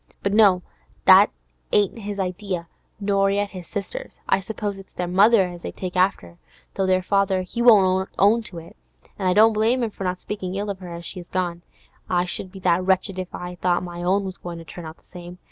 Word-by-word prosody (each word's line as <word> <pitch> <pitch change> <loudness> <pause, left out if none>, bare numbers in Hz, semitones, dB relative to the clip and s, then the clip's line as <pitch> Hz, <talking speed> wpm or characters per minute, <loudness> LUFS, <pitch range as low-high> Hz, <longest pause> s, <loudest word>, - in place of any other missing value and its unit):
But 200 - 0
no, 200 -4 +5 0.4
that - - +8 0.4
ain't 205 +2 +2
his 205 -1 -5
idea, 185 -2 -3 0.3
nor 200 -1 +2
yet 200 0 0
his 185 -3 -9
sister's. - - -6
I - - +3
suppose 205 0 -5
it's 195 - -15
their 180 - -3
mother 200 +4 +5
as 175 -1 -9
they - - -5
take 185 -1 -6
after, 135 - 0 0.3
though 195 - -1
their 185 0 +2
father 195 -1 +1
he 210 +6 -4
won't 190 -5 +5
own 215 +4 +4
to 175 - -8
it, 165 0 -11 0.4
an' 190 - 0
I 180 - +3
don't 220 +3 +6
blame 230 +4 +2
him 225 - -2
for 195 - -7
not 180 0 -2
speakin' 190 -3 -5
ill 205 +1 -2
of 190 - -8
her 180 -2 -9
as 170 0 -6
is 175 -2 -8
gone. 175 -2 -2 0.5
I 180 0 +2
should 185 +1 -4
be 195 - -11
that 180 0 +2
wretched 190 0 +1
if 185 -1 -6
I 180 0 -6
thought 180 -1 +1
my 175 -1 -7
own 190 +3 +1
was 190 -1 -6
goin' 175 -1 -7
to 165 - -10
turn 170 0 -9
out 160 - -10
the - - -30
same. 175 0 -11
185 Hz, 225 wpm, -23 LUFS, 180-200 Hz, 0.5 s, that